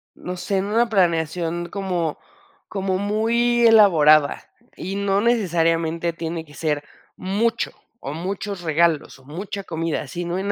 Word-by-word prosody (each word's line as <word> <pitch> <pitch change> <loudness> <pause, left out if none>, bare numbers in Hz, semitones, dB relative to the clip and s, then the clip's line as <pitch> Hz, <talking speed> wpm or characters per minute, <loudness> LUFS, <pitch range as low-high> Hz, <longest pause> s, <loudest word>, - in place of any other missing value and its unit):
no 180 0 -6
sé, 195 +2 -2
en 190 - 0
una 230 +3 +1
planeación 170 -3 0
como 180 -5 -2 0.5
como 190 -2 -2
muy 235 +4 +2
elaborada, 155 -10 +5 0.3
y 195 +2 -5
no 200 0 +1
necesariamente 170 -6 +1
tiene 165 0 -5
que 145 -2 -17
ser 150 -2 -1 0.3
mucho 205 +5 -1 0.3
o 140 - -6
muchos 190 +3 -4
regalos 160 -3 +1
o 130 - -21
mucha 195 +7 -6
comida, 165 -4 -3
sino 175 +5 -3
en 200 +1 -1
175 Hz, 135 wpm, -22 LUFS, 165-200 Hz, 0.5 s, elaborada